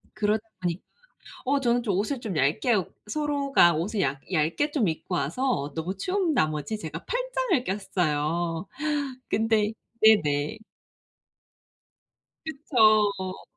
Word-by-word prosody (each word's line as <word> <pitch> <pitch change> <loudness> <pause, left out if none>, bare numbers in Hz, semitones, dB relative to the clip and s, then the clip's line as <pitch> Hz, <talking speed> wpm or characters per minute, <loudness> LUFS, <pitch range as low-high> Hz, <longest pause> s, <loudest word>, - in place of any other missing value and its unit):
그러다 215 0 +1 0.2
보니까 175 0 -2 0.6
어 280 +2 +2
저는 240 -1 +2
좀 205 -5 -1
옷을 240 +5 -1
좀 200 -9 -4
얇게 155 - +2
옷 190 -4 -2
서로가 280 - +3
옷을 195 +6 -2
얇 135 0 -1
얇게 170 - +1
좀 230 - +1
입고 160 - -3
와서 145 - -1
너무 175 +4 -3
추운 365 - 0
나머지 155 - 0
제가 160 -2 -7
팔짱을 - - 0
꼈어요. 170 -2 -1 0.6
근데 220 -1 +2 0.3
네네. 155 -5 +4 1.9
그쵸. 215 -10 +2
205 Hz, 220 characters per minute, -26 LUFS, 165-250 Hz, 1.9 s, 네네